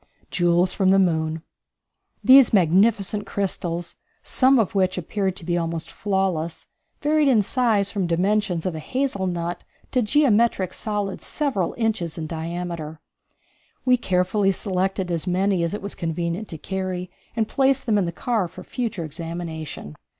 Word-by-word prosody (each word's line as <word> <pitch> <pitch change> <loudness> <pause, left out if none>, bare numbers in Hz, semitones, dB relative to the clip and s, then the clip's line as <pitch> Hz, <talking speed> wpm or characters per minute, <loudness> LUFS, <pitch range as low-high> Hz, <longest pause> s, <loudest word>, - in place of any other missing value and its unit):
Jewels 175 +1 +3
from 190 -1 +2
the 195 - +5
Moon. 160 -3 +1 0.8
These 260 -2 +7
magnificent 200 +3 +3
crystals, 175 -3 -3 0.3
some 265 +1 +3
of 225 -2 +1
which 185 -2 +1
appeared 190 +2 -2
to 185 - -9
be 175 0 0
almost 165 -1 -4
flawless, 190 -5 -1 0.4
varied 300 0 +3
in 230 -6 +4
size 215 -4 +1
from 195 -4 -1
the 170 - +1
dimensions 195 -1 0
of 185 - -1
a 160 - -5
hazelnut 185 - -2 0.3
to 255 - +2
geometrical 225 - +2
solids 205 -3 -3
several 270 - -1
inches 220 -9 -1
in 160 - -3
diameter. 165 -1 -5 0.9
We 255 -1 +5
carefully 195 -2 +1
selected 190 -1 -1
as 170 +1 -2
many 185 +1 +1
as 170 +4 -1
it 210 - -7
was 200 - -4
convenient 170 +4 -3
to 160 - -7
carry 185 +1 -4 0.2
and 220 -2 +1
placed 270 +1 +2
them 215 -4 +2
in 190 - +1
the 170 - -2
car 215 +1 -1
for 180 +2 -11
future 220 -9 -3
examination. 160 - -6
185 Hz, 150 wpm, -23 LUFS, 170-215 Hz, 0.9 s, These